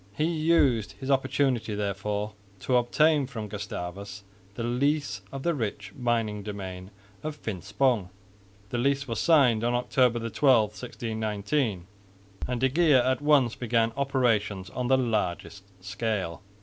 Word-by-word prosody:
He 155 - +2
used 155 -10 +2
his 135 0 -4
opportunity 130 -5 +1
therefore 105 +1 -2 0.3
to 130 - +1
obtain 145 +4 +3
from 115 -5 -6
Gustavus 100 0 -6 0.3
the 115 - -4
lease 125 -3 0
of 135 -1 -6
the 170 - +1
rich 105 -7 -4
mining 115 -4 -1
domain 95 -2 -7 0.3
of 155 -1 -4
Finspong. 110 - -1 0.6
The 120 - -1
lease 140 +2 +1
was 115 -2 -3
signed 135 -9 +4
on 120 +1 +1
October 120 -1 +1
12, 115 -3 +3
1619, 110 -2 -2 0.6
and 125 -1 -2
de 130 +2 +3
Geer 155 0 +4
at 130 0 +1
once 145 -6 +4
began 115 -1 +1
operations 115 -8 0
on 125 -1 -3
the 130 +1 +4
largest 105 -5 -2 0.2
scale. 100 -5 -2
120 Hz, 135 wpm, -27 LUFS, 105-135 Hz, 0.6 s, signed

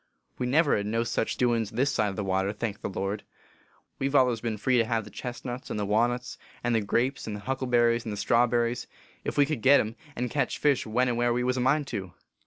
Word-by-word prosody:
We 125 - 0
never 145 +3 +3
hed 100 0 -1
no 115 +2 0
sech 115 -1 -1
doin 120 -2 +2
s 110 - -4
this 130 +6 +1
side 105 - +1
of 100 - -3
the 105 - -2
water, 95 +1 0
thank 105 -1 -4
the - - -3
Lord! 100 +2 -3 0.8
We 135 - +1
ve 140 +1 +2
allers 125 -4 +3
been 115 -2 -2
free 125 +4 +2
to - - +4
have 115 -1 -1
the 105 - -12
chesnuts 125 0 -6
and - - -3
the 105 - -1
wannuts 120 +4 0 0.2
and 120 0 +1
the 110 - +2
grapes 120 +6 0
and 105 - -3
the 105 - -7
huckleberries 120 -1 +1
and 110 - -5
the 105 - -4
strawberries, 120 +2 +1 0.4
ef - - -3
we 145 - +6
could 150 -5 -3
git 140 +3 +7
em, 110 +1 -2 0.2
and 125 0 -2
ketch 145 - 0
fish 145 -6 +2
when 125 +4 +2
and 120 -1 0
where 120 0 +2
we 125 +1 0
was 125 0 +1
a - - 0
mind 140 +4 +2
to. 95 -6 -5
120 Hz, 250 wpm, -27 LUFS, 110-125 Hz, 0.8 s, git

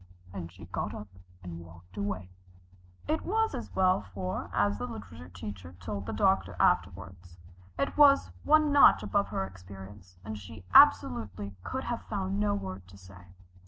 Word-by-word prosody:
And 85 -3 -6
she 90 - -12
got - - -4
up, 105 - -8 0.3
and 85 -2 -7
walked 90 +2 -15
away. 95 -3 -4 0.8
It 315 +1 0
was 445 +3 0
as - - -6
well, 185 - +3
for, 90 -1 -5
as 100 0 +1
the - - -3
literature 90 -4 -9
teacher 90 -1 -8
told 100 +1 -5
the - - -2
doctor 190 - +1
afterward, 95 - +1 0.6
it - - -1
was 285 -2 +6
one 305 0 +4
notch 285 -1 +7
above 200 -1 0
her 95 - -2
experience, 95 0 -12
and 110 0 -5
she 95 -2 -12
absolutely 100 -1 +4
could - - -4
have - - -3
found 95 +2 -2
no 105 0 +1
word 95 -2 -6
to 95 +2 -15
say. 90 -1 -15
95 Hz, 160 wpm, -29 LUFS, 90-105 Hz, 0.8 s, notch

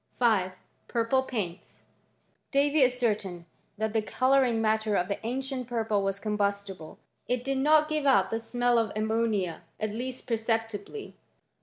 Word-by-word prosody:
5. 205 -7 +2 0.3
Purple 235 +2 +2
paints, 205 -9 -5 0.7
Davy 285 +1 +3
ascertained 215 -8 0 0.3
that 220 0 -1
the 220 - +2
colour 265 +5 +3
ing 235 -3 +1
matter 220 -1 +1
of 180 -2 +1
the 200 - -4
ancient 260 +1 -3
purple 225 -4 0
was 195 0 -1
combustible. 200 -5 -2 0.2
> - - -48
It 245 -1 0
did 270 0 -1
not 305 +2 +5
give 305 -2 -1
out 195 -8 +4
the 225 - 0
smell 245 +1 +1
of 225 -3 0
ammonia, 215 -5 0 0.2
at 215 -1 -1
least 250 +4 -5
per 230 -2 0
ceptibly. 225 - -3
225 Hz, 155 wpm, -28 LUFS, 205-255 Hz, 0.7 s, not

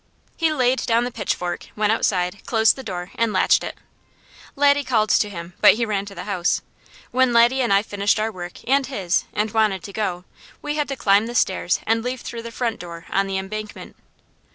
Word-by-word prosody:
He 325 -2 +1
laid 255 -3 +1
down 235 +1 +3
the 245 - -3
pitchfork, 180 -5 -3
went 210 0 +1
outside, 190 -3 0
closed 225 -1 +4
the 265 - -8
door, 180 -6 -6
and 230 -1 0
latched 185 - +3
it. - - -6 0.8
Laddie 285 0 +4
called 220 -5 +1
to 210 - +3
him, 170 -2 -8
but - - +8
he 235 +1 0
ran 205 -2 -2
to 200 - -10
the - - -6
house. 185 -4 0 0.5
When 255 -1 +3
Laddie 240 +3 +5
and 240 - 0
I 195 +1 +4
finished 205 0 0
our 220 +1 -1
work, 175 0 -9
and 270 0 +2
his, 190 -9 -1
and 210 +1 -1
wanted 210 -4 +1
to 200 - -9
go, 185 -4 -3 0.3
we 295 0 -3
had 295 -1 -1
to 275 - -3
climb 210 -2 +3
the 240 - -6
stairs 185 -5 +1
and 225 +1 +1
leave 250 0 -3
through 235 - -6
the 230 0 -8
front 230 -1 -2
door 170 -1 -9
on 195 0 +1
the 195 0 -2
embankment. 215 +2 -6
215 Hz, 210 wpm, -22 LUFS, 195-240 Hz, 0.8 s, but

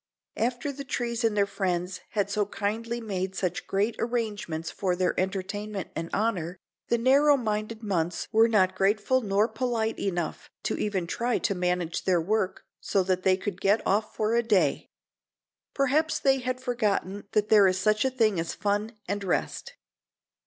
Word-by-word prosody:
After 245 +5 -1
the 280 0 -7
trees 240 -2 -2
and 220 -2 +1
their 200 - +4
friends 185 -2 -2
had 205 -2 +1
so 205 -1 +1
kindly 225 +3 -2
made 190 -4 -3
such 180 -2 -2
great 205 +4 0
arrangements 210 -9 -2
for 185 -2 -1
their 180 0 +1
entertainment 195 +1 -3
and 165 +1 -3
honor, 185 -5 -1 0.3
the 235 - +2
narrow 280 +4 +5
minded 220 -1 -3
months 175 -4 -1
were 225 0 +5
not 190 -5 +3
grateful 205 +7 +2
nor 205 0 +2
polite 225 -1 -1
enough 175 -5 -3
to - - -1
even 195 -4 -1
try 235 +7 0
to 200 - 0
manage 180 -2 -1
their 180 -2 +3
work 195 +3 -1 0.2
so 195 - +1
that 185 0 0
they 185 0 +3
could 195 -1 -5
get 205 +3 +2
off 210 +2 0
for 215 +1 0
a 235 - +4
day. 220 -5 +1 0.9
Perhaps 305 +4 +2
they 270 -3 +3
had 255 0 -2
forgotten 210 -6 -1
that 210 0 +2
there 205 -3 +7
is 185 0 +2
such 215 +2 +2
a 265 - +2
thing 220 -8 +2
as 165 0 -3
fun 210 +2 -1
and 200 +2 -2
rest. 475 - -2
210 Hz, 170 wpm, -27 LUFS, 185-230 Hz, 0.9 s, there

